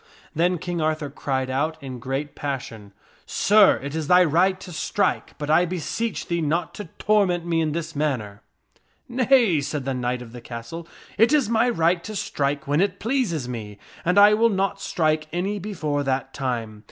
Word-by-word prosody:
Then 175 +3 +2
King 175 0 -3
Arthur 155 -2 -1
cried 130 -2 -2
out 150 +5 0
ments 160 - -22
King 135 -2 -7
in 125 - -7
great 135 +4 -3
passion, 120 -7 -5 0.2
" - - -31
Sir, 210 -1 +5
it 140 0 -5
is 160 -2 -3
thy 180 +1 +6
right 180 +4 +2
to 180 - -9
strike, 185 +4 -1
but 145 - -5
I 155 +3 +4
be 180 +1 -4
Arthur 170 - -4
seech 225 -10 -2
thee 170 -1 -1
not 160 +1 -1
to 210 - -7
torment 195 -5 +2
me 165 -1 +1
in 155 -2 0
this 165 0 -4
manner." 125 -9 -2 0.4
" - - -38 0.3
Nay," 240 - +3
said 140 -1 -4
the 135 - -1
knight 125 0 -2
of 115 - -13
the 120 0 -10
castle, 120 +9 -8 0.3
"it 225 +4 +5
is 280 -8 +3
my 230 +2 +3
right 170 -5 +1
to 215 - -7
strike 145 -5 -2
when 145 +4 +2
it 195 -1 0
pleases 215 - -1
me, 110 -4 -6 0.3
and 180 +3 +1
I 205 +1 +8
will 230 +2 +4
not 195 -2 -1
strike 155 -2 0
any 195 +5 -2
before 160 -8 -2
that 135 -1 -2
time. 115 -5 -3
160 Hz, 205 wpm, -24 LUFS, 140-190 Hz, 0.4 s, I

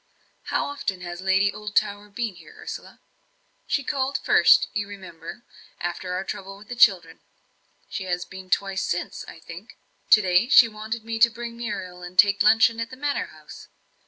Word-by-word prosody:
"How - - -1
often 240 -10 -4
has 175 0 -7
Lady 195 +1 +2
Oldtower 210 -1 -1
been 220 +1 -3
here, 440 - -16
Ursula?" 440 +1 -9 0.7
"She 280 - 0
called 270 +1 -1
first, - - +5
you 205 -1 -2
remember, 190 0 -10 0.4
after 175 +1 -4
our 185 - -2
trouble 195 0 -7
with 205 +1 -16
the 245 - -5
children; 245 - +3 0.7
she 190 - -5
has 180 -1 -2
been 185 0 -11
twice 195 0 0
since, - - -3
I - - -11
think. - - -12 0.3
To 215 - +7
day 185 +4 +3
she 255 -5 +8
wanted 220 +1 -6
me 225 0 -4
to 235 +1 +7
bring 235 0 -7
Muriel 190 -6 -6
and 180 +1 -10
take 200 0 +5
luncheon 225 +1 +5
at 230 +2 -3
the 260 - -11
Manor 290 +1 -2
House. - - -13
205 Hz, 175 wpm, -24 LUFS, 190-235 Hz, 0.7 s, she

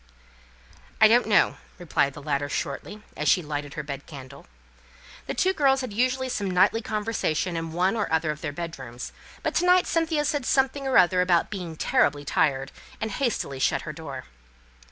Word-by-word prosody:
"I 215 - +8
don't 235 +1 +4
know," 210 - +3 0.2
replied 155 -6 0
the 145 - -10
latter, 145 -1 -1
shortly, 205 +11 -4
as - - 0
she 180 - +4
lighted 145 -1 -5
her 155 - -4
bed 140 -1 -7
candle. 140 -2 -11 0.8
The - - -3
two 375 0 +2
girls 270 -5 +3
had 255 -5 -5
usually 255 +3 +1
some 205 -6 -2
nightly 190 +5 +3
conversation 210 -6 -1
in 165 -1 -3
one 180 +5 +1
or 210 -6 -2
other 160 -1 +1
of 150 - -8
their 145 - -3
bed 165 0 -6
rooms; 120 -1 -8 0.3
but - - -1
to 360 - +2
night 360 0 +5
Cynthia 320 -2 0
said 290 -3 -1
something 270 +1 +1
or 265 - +3
other 180 0 +5
about 175 -2 +2
being 180 -5 -5
terribly 155 - +1
tired, 135 -2 +1 0.3
and 220 0 -3
hastily 220 - -2
shut - - +1
her 155 - -6
door. 140 -5 -7
180 Hz, 185 wpm, -25 LUFS, 145-245 Hz, 0.8 s, I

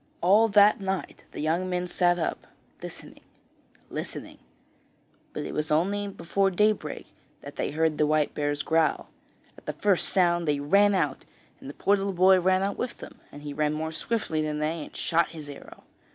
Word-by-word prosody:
All 205 +6 +5
that 205 0 +5
night 190 -1 -4
the - - -6
young 170 +4 0
men 180 0 -1
sat 175 0 +2
up, 165 - -3 0.3
listening, - - -10 0.7
listening; - - -6 0.9
but - - -5
it - - -6
was 150 0 -2
only 200 +7 +1
before 195 0 0
daybreak 210 +3 0 0.3
that - - -10
they - - -2
heard 155 +1 0
the 150 - +3
white 155 -1 +1
bear's 145 0 -2
growl. 160 -1 +1 0.5
At - - -31
the - - -2
first 200 -4 +1
sound 175 -3 +2
they 145 -1 +1
ran 200 +8 +4
out, 150 -7 -1 0.3
and - - -10
the 145 - -9
poor 200 - +2
little 195 0 -2
boy 185 +1 +5
ran 185 +1 +2
out 200 +1 -2
with 245 -1 -3
them, - - -12
and 145 - -11
he 145 -1 -6
ran 150 +1 0
more 160 +1 -3
swiftly 165 -3 -2
than 150 -1 -2
they 155 +1 -2
and - - -15
shot 170 +1 +1
his 150 -2 -8
arrow. 145 -1 -12
175 Hz, 185 wpm, -26 LUFS, 155-195 Hz, 0.9 s, All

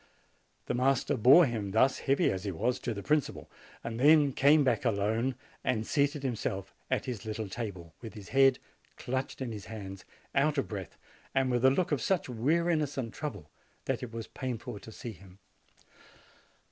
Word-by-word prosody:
The - - -2
master 130 +1 +2
bore 135 +9 +7
him 110 -6 -3
thus, 115 +6 +3
heavy 140 +6 +2
as 95 0 -4
he 100 - -2
was, 120 +9 -1
to - - -3
the 100 - -6
principal, 150 -1 -1 0.3
and 115 0 -4
then 145 0 +6
came 145 +3 +5
back 120 -5 +1
alone 110 +6 0 0.3
and 115 -3 0
seated 140 +1 +1
himself 100 -6 -3 0.2
at - - 0
his 120 -5 -5
little 110 -1 -4
table, 95 -6 -6
with 115 -1 -9
his 105 -3 -10
head 135 -1 +5 0.4
clutched 130 +2 -3
in 125 -3 -3
his 105 -4 -7
hands, 95 -2 -8 0.3
out 150 +2 +2
of 135 - 0
breath, 100 -5 -7 0.4
and 135 -1 +2
with 120 0 +1
a 130 - +8
look 165 +6 0
of 145 - +1
such 190 -2 0
weariness 150 +5 +1
and 120 -3 -3
trouble 145 - -6 0.3
that - - -1
it 125 - -6
was 115 -1 -5
painful 125 -5 -5
to 110 - -11
see 115 +2 -7
him. 95 -1 -15
125 Hz, 180 wpm, -30 LUFS, 105-135 Hz, 0.4 s, a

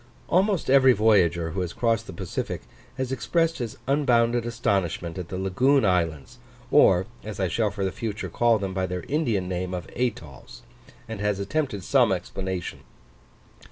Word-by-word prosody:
Almost 190 0 +2
every 130 -1 +6
voyager 90 -7 +3
who 95 - -2
has 90 -2 -4
crossed 115 -2 0
the - - -6
Pacific 95 -4 -5 0.3
has 130 -1 -2
expressed 165 - 0
his 120 -3 -5
unbounded 120 -4 +2
astonishment 95 -7 -1
at 90 - -6
the 95 - -5
lagoon 125 +8 +2
islands, 90 - -1 0.3
or 95 -11 +5 0.2
as 105 -1 -7
I 95 - +1
shall 105 +5 0
for 100 -1 -3
the 95 - -1
future 110 0 -4
call 120 -1 +2
them 100 -2 -4
by 95 0 -1
their 90 -1 -4
Indian 120 - -1
name 90 0 -3
of 90 0 -6
atolls, 80 - -5 0.4
and 110 -3 -6
has 105 -1 0
attempted 110 - -2
some - - +3
explanation. 95 -2 -4
105 Hz, 160 wpm, -25 LUFS, 90-120 Hz, 0.4 s, every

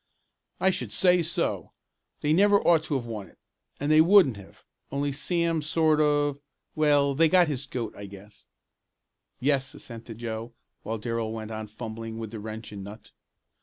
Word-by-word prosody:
"I 190 - +4
should 125 - -5
say 180 - +4
so! 165 +1 -2 0.5
They 150 +1 +2
never 200 +3 +5
ought 165 -2 +5
to 150 - -2
have 125 -3 -2
won 110 -4 -6
it, - - -22 0.4
and 145 +2 0
they 155 0 +7
wouldn't 175 - +6
have, 100 -1 -15 0.3
only 140 +1 -1
Sam 165 +3 0
sort 155 0 +2
of 145 -1 +2 0.3
well 145 -2 +3
they 160 +3 +4
got 180 -1 +5
his 140 -2 -3
'goat' 120 -4 -4
I 100 - -8
guess." 100 +1 -14 0.9
"Yes," 135 0 +1
assented 115 -2 -9
Joe, 115 0 -5 0.3
while 110 +2 -4
Darrell 115 0 -3
went 110 0 -6
on 110 0 -5
fumbling 115 +1 -7
with 110 -2 -6
the 115 - -6
wrench 110 +1 -7
and 100 -2 -7
nut. 105 +3 -11
130 Hz, 170 wpm, -27 LUFS, 110-155 Hz, 0.9 s, they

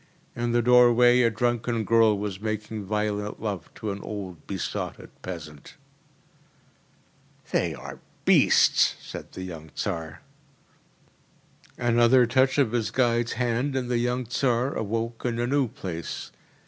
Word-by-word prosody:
In 120 0 -1
the 120 0 +2
doorway 125 0 +6
a 115 - +4
drunken 120 0 -1
girl 110 -1 +4
was 100 -2 -4
making 110 -1 -4
violent 105 0 -2
love 100 -6 -4
to 105 - -4
an 100 0 -6
old 95 -7 -7
besotted 95 -3 -5
peasant. 75 -5 -9 1.8
“They - - 0
are 70 +2 -9 0.3
beasts!‚ÄĚ - - +4
said - - -8
the 95 - -6
young 80 -4 -8
Tsar. 80 -5 -4 1.6
Another 120 +1 +4
touch 130 +3 +2
of 135 -6 +3
his 115 -4 0
guide’s 120 -1 +1
hand 125 +3 -1
and 125 -2 -2
the 120 - +2
young 125 +1 -1
Tsar 125 +2 0
awoke 115 +2 -3
in 120 -2 -1
a 120 - 0
new 135 +1 +1
place. 85 -7 -6
115 Hz, 135 wpm, -26 LUFS, 100-120 Hz, 1.8 s, doorway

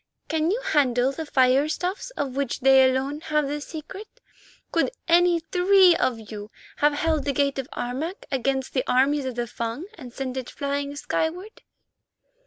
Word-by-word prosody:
Can 320 0 +1
you 430 +6 0
handle 265 - +2
the 315 +2 -6
firestuffs 295 - +1
of 270 -3 -3
which 275 -1 -2
they 265 0 +6
alone 270 +3 -2
have 300 -2 0
the 295 +1 -3
secret? 325 +8 -8 0.6
Could - - +2 0.2
any 345 0 +4
three 365 +2 +5
of 225 -7 -2
you 210 -1 -7 0.3
have 295 0 +3
held 310 0 0
the 280 - -1
gate 280 0 0
of 265 - -4
Harmac 290 - -4
against 265 0 -1
the 255 - +1
armies 275 +2 +2
of 255 -2 -4
the 240 0 -1
Fung 235 +6 -5
and 250 -4 -9
sent 260 0 -5
it 255 -2 -4
flying 280 0 -3
skyward?" 350 +8 -3
280 Hz, 165 wpm, -24 LUFS, 260-320 Hz, 0.6 s, they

